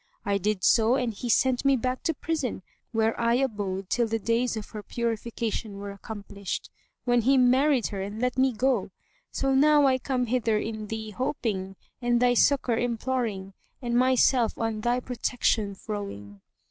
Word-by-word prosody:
I 200 -1 +1
did 205 -1 -1
so 230 +2 +4
and 250 -4 -1
he 240 +4 -5
sent 255 +1 +3
me 275 -1 +4
back 255 +1 -2
to 325 - +1
prison, 290 - -3 0.3
where 225 -1 +2
I 235 0 +3
abode 205 -7 -2
till 235 +3 +1
the 225 +1 -1
days 230 +2 0
of 210 - -7
her 210 - -6
purification 230 -2 -3
were 200 0 -6
accomplished, 200 -1 -6 0.3
when 245 -1 +3
he 265 +4 +4
married 255 0 +4
her 195 -2 -4
and 205 +3 -5
let 250 +1 0
me 265 0 +3
go. 245 -3 0 0.4
So 270 0 0
now 295 +1 +5
I 260 -1 +3
come 255 -1 -1
hither 230 -2 +1
in 215 0 -4
thee 220 0 -5
hoping 205 -5 -3 0.3
and 240 -1 +2
thy 245 0 +4
succour 245 -1 +3
imploring 230 -5 -2 0.3
and 240 -1 -2
myself 250 -1 +3
on 225 -1 -2
thy 240 +2 +1
protection 230 -4 -1
throwing." 145 - -7
235 Hz, 170 wpm, -27 LUFS, 210-255 Hz, 0.4 s, now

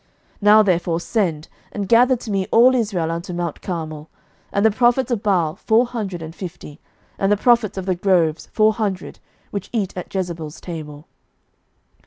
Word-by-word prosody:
11:018:019 - - -34
Now 210 +1 +7
therefore 175 -3 +1
send, 170 -6 -1 0.2
and 200 -2 -4
gather 245 +4 +5
to 235 -2 -7
me 195 -1 -1
all 245 +3 +6
Israel 200 -9 0
unto 170 +2 -5
mount 170 -2 -4
Carmel, 155 -4 -5 0.4
and 200 +2 +1
the 220 - +5
prophets 245 +3 +2
of 230 -4 0
Baal 180 -7 +1
four 225 +3 +3
hundred 200 -8 -5
and 160 0 -8
fifty, 165 -4 -9 0.4
and 195 +1 +1
the 205 - +4
prophets 235 -3 +2
of 190 - -4
the 190 - +1
groves 175 -4 +1
four 215 0 +3
hundred, 200 -5 -4 0.3
which 200 -2 -5
eat 205 -6 -2
at 180 - -7
Jezebel's 170 -5 -4
table. 155 -3 -8
190 Hz, 175 wpm, -21 LUFS, 170-220 Hz, 0.4 s, Now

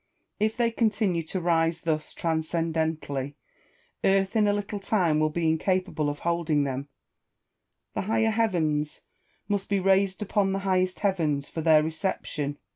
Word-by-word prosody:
If 215 +1 0
they 235 -1 +2
continue 210 -6 +1
to 185 - -2
rise 165 -1 +1
thus 155 -2 -2
transcendently, 160 -4 -1 0.7
earth 195 +2 +2
in 215 -2 +4
a - - +4
little 205 0 -3
time 180 -6 +1
will 155 0 +2
be 165 +1 -1
incapable 160 -1 0
of 145 - -5
holding 170 -3 +1
them, 135 0 -3 1.1
and - - -2
higher 225 +1 +2
heavens 160 -10 0 0.5
must 200 -1 -1
be 200 -1 +2
raised 190 +1 +2
upon 200 -1 +1
the 195 - -1
highest 185 -1 +1
heavens 160 -8 0
for 165 - -4
their 155 -1 +5
reception. 155 -3 -3
170 Hz, 145 wpm, -27 LUFS, 155-195 Hz, 1.1 s, their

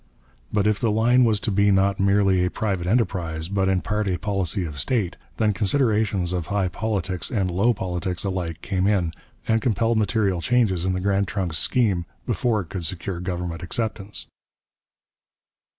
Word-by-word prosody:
But 105 -1 +1
if 105 -1 +2
the 115 - +1
line 120 +4 +4
was 110 -3 +2
to 110 - -1
be 100 +1 +3
not 100 0 +3
merely 100 -1 +3
a 90 - +1
private 95 -5 -2
enterprise, 90 -7 0
but 95 0 +1
in 95 -1 +2
part 105 +5 -1
a 90 -2 0
policy 95 -2 -1
of 75 -3 -6
state, 100 - 0 0.2
then 110 -2 +2
considerations 105 -4 +1
of 85 -3 -2
high 100 -2 0
politics 95 -2 -2
and 95 -7 0
low 100 +7 +3
politics 90 -3 -3
alike 90 -4 -3
came 95 -1 0
in, 90 -6 +1 0.3
and 110 0 +2
compelled 115 -1 +1
material 100 -4 +1
changes 105 -6 +2
in 95 - +1
the 90 - -2
Grand 100 0 +1
Trunk's 90 -7 -1
scheme 100 -9 +1 0.2
before 115 -4 +1
it 85 - -10
could 95 -2 -4
secure 90 +1 -3
government 90 -2 -4
acceptance. 105 +2 -3
95 Hz, 170 wpm, -24 LUFS, 90-105 Hz, 0.3 s, line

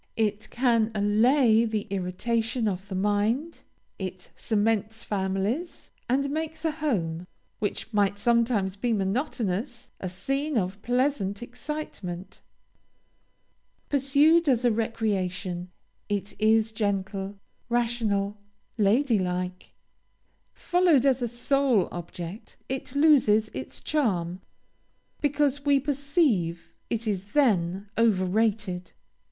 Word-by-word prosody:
It 215 -1 -1
can 235 -3 +2
allay 220 +3 +4
the 220 -2 -1
irritation 220 +5 -1
of 190 -1 -3
the 195 - -5
mind; 210 - 0 0.4
it 185 -1 -6
cements 220 +1 0
families, 200 - -2 0.2
and 275 +3 +2
makes 315 +1 -4
a 320 - +2
home, 180 - -2 0.3
which 215 +2 -3
might 205 -1 +2
sometimes 225 -3 +2
be 235 +3 0
monotonous, 230 +2 -2
a 185 - -4
scene 275 +9 -2
of 195 0 -2
pleasant 245 -4 0
excitement. 240 - -6 1.5
Pursued 290 +4 +4
as 250 -2 +2
a 240 - +5
recreation, 195 -5 -2 0.4
it 205 0 -2
is 220 0 +4
gentle, 200 -2 -2 0.3
rational, 220 -4 0 0.4
lady 225 +3 +3
like. 180 0 -3 0.8
Followed 350 -7 +3
as 265 -2 +3
a 240 - 0
sole 245 -3 +2
object, 175 +3 -8
it 265 0 -5
loses 250 -8 +4
its 130 - -6
charm, 185 - -1 0.8
because 290 -1 +1
we 285 -1 +4
perceive 275 - 0 0.2
it 230 0 -2
is 200 -1 -3
then 200 -8 +2
over 210 -5 +3
rated. 200 -3 -1
220 Hz, 105 wpm, -27 LUFS, 195-260 Hz, 1.5 s, a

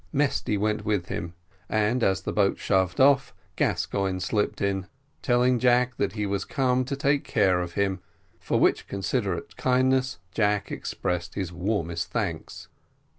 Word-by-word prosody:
Mesty 140 -7 +1
went 105 +1 0
with 105 -4 -1
him, 85 0 -4 0.3
and, 110 +3 +1
as 95 0 +2
the - - -4
boat 100 -2 +2
shoved 95 -2 +1
off, 135 0 +4 0.2
Gascoigne 95 -2 0
slipped 105 +4 -1
in, 95 -2 -1 0.3
telling 125 0 +3
Jack 125 0 +3
that - - 0
he 105 -2 -2
was 100 -1 -1
come 130 -2 +1
to 140 +2 -3
take 140 0 +1
care 95 -5 +2
of 85 -1 -5
him, 100 -2 0 0.4
for - - 0
which - - +2
considerate 100 -1 -2
kindness 130 -2 +2
Jack 105 -1 0
expressed 90 0 -3
his 95 -3 -3
warmest 85 -2 -2
thanks. 95 -9 -4
105 Hz, 150 wpm, -26 LUFS, 95-125 Hz, 0.4 s, off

